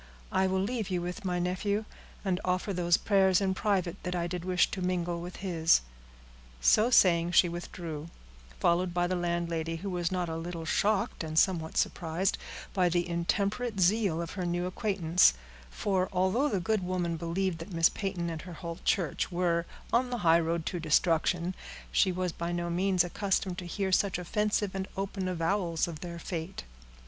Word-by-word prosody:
"I 190 0 +2
will 190 0 +1
leave 220 -1 -2
you 180 -2 0
with 180 +5 -5
my 180 -1 0
nephew, 195 +4 -1 0.4
and 185 -2 0
offer 185 +2 0
those 175 -1 +3
prayers 190 -3 +3
in 195 -1 +1
private 190 -2 -1
that 180 0 -3
I 170 -1 0
did 175 0 -4
wish 180 0 +2
to 190 - -4
mingle 175 -1 -1
with 180 +1 -7
his." 165 - +4 0.8
So 215 - +4
saying, 175 -7 +4
she 175 - +6
withdrew, 170 -2 -6 0.5
followed 175 +1 +2
by 175 0 +2
the 185 +1 0
landlady, 170 -2 -1
who 190 +4 -5
was 175 -1 -1
not 180 -1 -1
a 160 - -3
little 165 0 -5
shocked, 200 +2 +1
and 155 0 -4
somewhat 165 -3 +2
surprised, 175 +3 0 0.3
by 185 -3 +3
the 175 0 0
intemperate 200 +6 -1
zeal 185 -3 +2
of 165 - -7
her 185 -1 -4
new 175 0 -1
acquaintance; 180 - +3 0.3
for, 185 - 0
although 190 +10 +2
the 200 - 0
good 215 +3 0
woman 180 -2 -1
believed 170 +2 -2
that 165 +5 -8
Miss 165 -1 +4
Peyton 185 -4 -3
and 160 -1 -5
her 180 +1 -9
whole 170 +1 -6
church 175 -2 0
were 170 -1 0 0.3
on 250 +2 +3
the 245 - -2
highroad 165 0 +3
to 175 - -2
destruction, 170 +2 +2 0.4
she 190 - +3
was 180 0 -1
by 170 +1 -4
no 175 0 -2
means 185 +1 +2
accustomed 190 +1 -1
to 180 - -7
hear 190 +2 -2
such 190 0 +2
offensive 210 +2 0
and 190 0 -3
open 195 -1 -3
avowals 175 -1 0
of 165 -3 -7
their 170 0 -6
fate. 170 +2 -5
180 Hz, 180 wpm, -30 LUFS, 170-190 Hz, 0.8 s, she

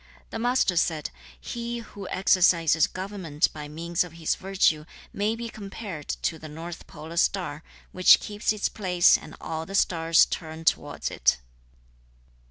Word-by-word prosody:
The 225 - -4
Master 245 -6 +2
said, 160 -2 0 0.3
'He 235 - -5
who 205 -4 -9
exercises 170 -4 +4
government 185 -6 -2
by 150 -1 -7
means 170 +4 -1
of 175 -3 -11
his 165 -1 -1
virtue 185 -5 +1 0.3
may 210 +2 0
be 235 0 -5
compared 200 -7 -8 0.2
to 160 - -1
the 155 - -9
north 165 +3 -8
polar 160 +2 -9
star, 165 -5 0 0.3
which 185 0 +7
keeps 210 +1 -1
its 215 -1 0
place 180 -4 +4
and 155 - -6
all 160 0 -5
the 195 - -5
stars 165 -4 +4
turn 160 -1 -6
towards - - 0
it.' - - +2
175 Hz, 150 wpm, -26 LUFS, 160-200 Hz, 0.3 s, which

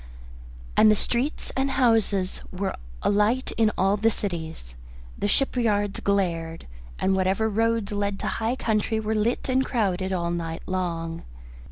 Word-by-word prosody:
And 215 - +7
the 215 - +5
streets 250 +8 -1
and 270 +1 +1
houses 225 -7 +2
were 190 +2 -2 0.3
alight 210 +5 +2
in 225 -1 +4
all 195 +2 +3
the 220 +2 +3
cities, 160 - -4 0.4
the - - -1
shipyards 210 -4 +1
glared, 170 -5 -1 0.3
and 190 - +1
whatever 190 +3 +1
roads 225 0 +1
led 205 -1 -1
to - - -2
high 225 +3 -1
country 220 -2 0
were 220 0 -1
lit 220 +3 0
and 260 0 +2
crowded 190 -7 0
all 170 -2 -1
night 165 -1 -4
long. 170 -3 -3
205 Hz, 145 wpm, -25 LUFS, 185-225 Hz, 0.4 s, And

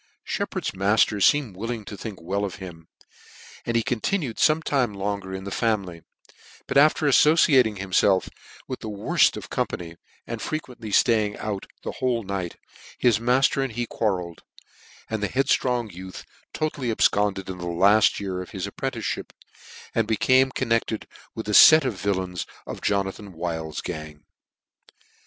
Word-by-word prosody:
Sheppard's - - -3
matter 100 +1 +2
feemed 130 -2 +3
willing 115 +2 -5
to 105 - -7
think 105 -1 -7
well 95 +5 -2
of 100 -3 -3
him, 85 -5 -10 0.8
and 120 - -1
he 115 - +1
continued 130 - -2
ibme 155 +1 +3
time 125 -9 0
longer 100 -1 -3
in 95 0 -5
the 100 - -6
family; 95 -6 -1 0.6
but - - -5
after 150 +2 +5
aiTociating 140 -6 +5
himfelf 95 0 +2 0.4
with 130 - -5
the 110 - -6
worft 100 -1 +2
of - - -9
company, 85 -1 -3 0.3
and 115 -2 -5
frequently 125 -8 -5
Haying 105 -1 +3
out 105 -2 -4 0.2
the - - -3
whole 125 -3 -1
night, 95 -3 -4 0.4
his 115 -4 +3
matter 130 +3 +2
and 135 -4 -2
he 120 +1 -2
quarrelled, 90 -7 -2 0.7
and 110 -2 -3
the 105 - -1
headftrong 125 -3 +1
youth 95 +1 -9 0.3
totally 150 -4 -3
abfconded 105 -3 +1
in 95 -1 -6
the 85 - -5
laft 100 +5 +4
year 95 -2 -3
of 90 - -9
his 95 -3 -5
apprenticemip, - - -4 0.6
and 115 -2 +1
became 130 +4 +3
connected 115 -4 -1 0.3
with 110 -1 -6
a 105 - -1
fet 155 +7 +9
of 130 - 0
villains 95 -3 -2 0.2
of - - -7
Jonathan 100 0 -2
Wild's 80 -2 -4
gang. 75 -1 -7
105 Hz, 150 wpm, -24 LUFS, 95-120 Hz, 0.8 s, fet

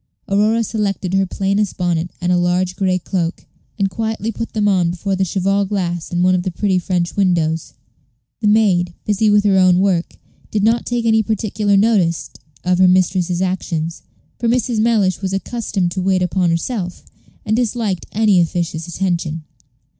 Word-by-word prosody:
Aurora 215 +3 +2
selected 200 -4 -2
her 195 0 +2
plainest 195 +2 -1
bonnet 175 -1 -1
and 180 0 0
a - - +4
large 180 +1 0
gray 185 -2 +1
cloak, 175 -1 -3 0.3
and 200 -2 +1
quietly 220 +2 -3
put 230 +2 -6
them 210 -1 +1
on 185 -4 +2
before 190 +3 -2
the 190 - 0
cheval 195 +2 +1
glass 180 -4 -3
in 175 0 0
one 185 0 +4
of 180 - +1
the 185 - -2
pretty 185 +1 0
French 175 -1 -2
windows. 165 -5 0 0.7
The 220 - 0
maid, 190 -5 +2
busy 210 +1 +2
with 205 0 +4
her 195 -2 +3
own 185 -1 +5
work, 185 -3 0 0.3
did 210 -2 -1
not 230 +2 +2
take 240 -1 -1
any 220 -1 +4
particular 210 -1 0
notice 195 -6 +2 0.3
of 180 0 +1
her 185 - +6
mistress's 180 -1 +2
actions; 170 -3 -3 0.4
for 235 - 0
Mrs. 240 -1 0
Mellish 215 -5 +2
was 190 -1 -2
accustomed 195 -3 -2
to 185 - -3
wait 185 0 +1
upon 180 0 +1
herself, 180 +2 -3 0.4
and 215 0 +1
disliked 225 -5 -1
any 210 -3 +3
officious 170 -1 -2
attention. 170 -3 -2
190 Hz, 170 wpm, -18 LUFS, 175-210 Hz, 0.7 s, her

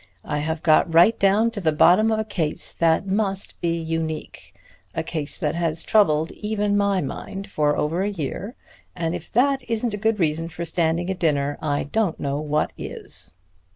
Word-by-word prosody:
I 150 - -2
have 160 +2 -3
got 160 +1 +4
right 175 +7 +5
down 205 +4 +3
to 215 -3 -5
the 160 -3 +2
bottom 180 +8 +5
of 220 - +1
a 220 - 0
case 175 -8 -2
that 165 +2 +2
must 195 0 -1
be 170 -1 0
unique, 160 -1 -4 0.4
a - - -1
case 155 -3 -4
that 150 -5 -1
has 165 -1 0
troubled 160 -7 +3
even 210 -1 -1
my 200 -2 +2
mind 195 +7 -6
for 150 -6 +1
over 165 +5 0
a 200 - 0
year, 195 - -5 0.4
and 165 -1 -2
if 175 -1 -7
that 270 +3 +3
isn't 230 0 -1
a - - -2
good 220 -1 +1
reason 165 0 0
for 170 0 -5
standing 170 +2 0
a - - +1
dinner, 145 -5 0
I 145 -2 0
don't 200 +3 -1
know 140 0 -2
what 150 0 -1
is. - - -2
170 Hz, 190 wpm, -23 LUFS, 155-205 Hz, 0.4 s, right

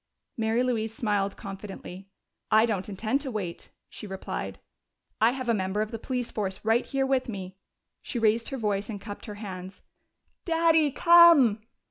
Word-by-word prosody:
Mary 225 +2 +1
Louise 225 -3 -1
smiled 205 -3 -1
confidently. 195 -1 -9 0.4
"I 220 +1 +5
don't 210 -4 -2
intend 220 +7 -1
to 275 - -4
wait," 195 -7 -5 0.2
she 210 - -9
replied. 190 -1 -5 0.6
"I 225 - +6
have 255 -2 -5
a 235 - +3
member 190 0 -1
of 215 - -7
the 230 - -5
police 250 0 -3
force 195 -3 -3
right 225 +2 +3
here 270 -1 0
with 265 -2 0
me." 190 -3 -6 0.5
She - - -5
raised 225 0 +2
her 270 - -4
voice 210 -2 -1
and 205 -3 -5
cupped 205 +2 -9
her 210 - -6
hands. 190 -2 -8 0.6
"Daddy, 325 -2 +3
come!" 325 - +6
220 Hz, 165 wpm, -27 LUFS, 200-255 Hz, 0.6 s, I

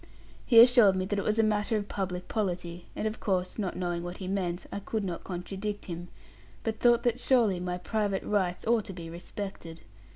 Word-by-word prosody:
He 230 -3 +8
assured 235 -5 +8
me 185 0 0
that 200 +1 -1
it - - -2
was 215 +3 0
a 225 - +4
matter 215 +1 +1
of 205 -1 -3
public 180 -3 -3
polity; 175 -5 -3
and 220 - -1
of 215 - -4
course, 185 0 -1
not 195 -4 -2
knowing 175 -1 -2
what 175 +1 -6
he 185 - -6
meant, 185 -2 -2
I - - -3
could 215 +1 -3
not 180 -3 -4
contradict 195 +3 -5
him; 175 0 -6 0.6
but 220 -1 -2
thought 240 -1 +4
that 240 0 +1
surely 235 -8 +3
my 180 0 -2
private 205 0 -1
rights 185 -4 0
ought 230 -2 +2
to 195 - -6
be 165 -2 -8
respected. 170 -1 -7
195 Hz, 205 wpm, -29 LUFS, 180-215 Hz, 0.6 s, He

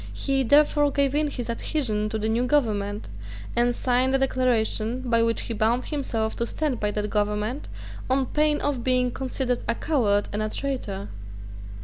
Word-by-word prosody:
He 275 -1 +1
therefore 290 +2 +4
gave 280 -1 +1
in 300 0 +1
his 245 -4 -5
adhesion 230 -3 -1
to 220 - -2
the 215 0 -1
new 235 +3 +1
government, 210 -7 0 0.5
and 240 0 +2
signed 255 +2 +1
a - - +5
declaration 250 -3 0
by 230 -1 +3
which 230 0 +1
he 230 - -4
bound 230 +3 +1
himself 230 -7 -2
to 235 - -1
stand 295 -4 -2
by 210 - 0
that 210 0 -2
government, 210 +5 -1 0.4
on 265 +1 +2
pain 300 +2 +1
of 275 -4 -1
being 250 -1 +2
considered 255 -1 -2
a 235 - +1
coward 215 -11 +1
and 210 - -1
a 215 - -1
traitor. 215 -8 -4
245 Hz, 170 wpm, -25 LUFS, 220-270 Hz, 0.5 s, a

